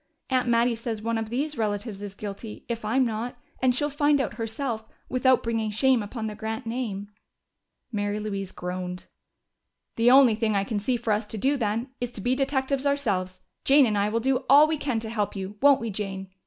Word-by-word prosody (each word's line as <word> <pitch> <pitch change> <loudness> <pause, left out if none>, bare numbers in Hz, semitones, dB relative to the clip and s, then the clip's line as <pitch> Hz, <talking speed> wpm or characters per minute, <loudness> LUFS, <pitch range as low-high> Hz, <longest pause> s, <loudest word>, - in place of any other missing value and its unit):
Aunt 255 -1 +2
Mattie 235 +1 +3
says 230 -1 -4
one 225 +1 -1
of 220 -1 -4
these 280 +4 -2
relatives 205 -1 -2
is 200 -1 -6
guilty, 210 +2 -7
if 235 -1 -4
I'm 255 +5 +2
not, 230 +2 -3 0.2
and 255 -1 +3
she'll 290 +3 0
find 290 0 +3
out 265 - -1
herself, 225 0 -3 0.3
without 255 0 +3
bringing 225 -2 -1
shame 245 +3 +3
upon 220 +2 -5
the 215 - -3
Grant 220 +3 -5
name." 225 -4 -3 0.8
Mary 205 -1 -1
Louise 200 -3 -4
groaned. 180 0 -5 0.9
"The 230 +1 +5
only 260 -2 +7
thing 215 -1 0
I 195 - +2
can 205 +1 -2
see 245 +5 0
for 225 -2 0
us 210 +1 -1
to 220 - -5
do, 270 +7 +2
then, 230 +1 -1
is 245 - -1
to 205 - -5
be 245 +5 +1
detectives 270 0 0
ourselves. 195 -10 -1 0.2
Jane 275 0 +6
and 215 -3 0
I 205 +1 +2
will 225 +2 0
do 260 +2 +1
all 285 +3 +9
we 315 0 -1
can 265 -6 -1
to 220 - -5
help 210 -3 -1
you, 195 +1 -6
won't 280 -1 +6
we, 230 -1 -3
Jane?" 195 -1 -5
225 Hz, 210 wpm, -26 LUFS, 210-260 Hz, 0.9 s, all